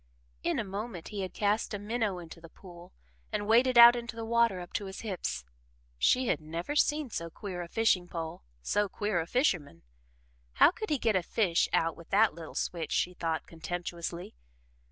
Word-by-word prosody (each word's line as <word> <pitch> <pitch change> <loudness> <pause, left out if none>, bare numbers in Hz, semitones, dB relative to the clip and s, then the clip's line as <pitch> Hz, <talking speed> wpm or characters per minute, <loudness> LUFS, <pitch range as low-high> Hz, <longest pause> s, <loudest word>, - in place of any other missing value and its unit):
In - - 0
a - - 0
moment 200 -2 -6
he 205 -2 -4
had 185 - -4
cast 210 +1 0
a - - -2
minnow 210 -1 -2
into 165 -1 -10
the 165 - -12
pool 175 0 -14 0.4
and 210 -1 -2
waded 240 +3 +4
out 235 0 +11
into 235 -1 -5
the 225 0 -5
water 230 -4 +2
up 175 -1 -9
to 205 - -2
his 190 0 -7
hips. 65 - -4 0.5
She 255 - +3
had 225 - 0
never 165 - -4
seen 300 -3 +2
so 170 -3 -4
queer 180 +1 -6
a 175 - -6
fishing 185 -3 +2
pole 165 -2 -6 0.2
so 205 - +1
queer 205 -2 -1
a 165 - -6
fisherman. 175 - 0 0.7
How - - +6
could 435 +2 -6
he 300 - +2
get 225 -4 +1
a 185 - +3
fish 175 -1 +1
out 165 0 +1
with 170 - -14
that 210 0 +4
little 165 0 -10
switch, 165 -3 -3
she 180 - +1
thought 165 -2 -2
contemptuously? 170 +1 -5
195 Hz, 195 wpm, -30 LUFS, 170-225 Hz, 0.7 s, out